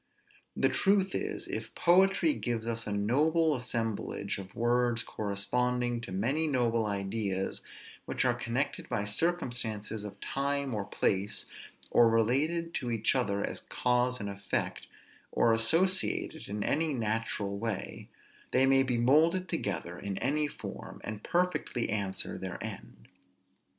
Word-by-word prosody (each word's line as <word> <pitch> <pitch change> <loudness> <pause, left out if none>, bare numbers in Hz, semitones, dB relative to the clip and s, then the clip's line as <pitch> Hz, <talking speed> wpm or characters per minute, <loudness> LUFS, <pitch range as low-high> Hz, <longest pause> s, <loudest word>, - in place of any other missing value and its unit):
The - - +3
truth 195 -1 +2
is, - - -3
if 110 0 -5
poetry 190 - +4
gives 115 - -2
us 115 -1 -1
a - - -2
noble 150 +10 +2
assemblage 115 -5 -2
of 95 0 -10
words 120 0 +2
corresponding 120 +4 -1
to 120 - -8
many 130 +12 0
noble 115 -5 +1
ideas, 100 -1 -2 0.4
which - - -1
are - - +4
connected 125 +5 -2
by 100 - -1
circumstances 110 -6 -1
of 100 -1 -8
time 140 +1 -1
or 105 -2 -2
place, 100 +1 0 0.5
or 120 -1 +6
related 145 +10 +1
to 125 - -3
each 115 -2 +2
other 100 -6 0
as - - -4
cause 125 0 +1
and 100 - -4
effect, 100 -1 -2 0.4
or 115 - +3
associated 165 - +2
in 105 0 -2
any 155 -1 +1
natural 110 -3 -2
way, 110 -3 -4 0.4
they 130 +1 +4
may 135 0 +5
be 125 -2 +1
moulded 160 +9 +4
together 90 - -3
in 100 -1 -4
any 150 +3 +1
form, - - -8
and 110 -1 -5
perfectly 175 - 0
answer 100 -3 -1
their - - -5
end. - - -8
120 Hz, 135 wpm, -30 LUFS, 105-140 Hz, 0.5 s, or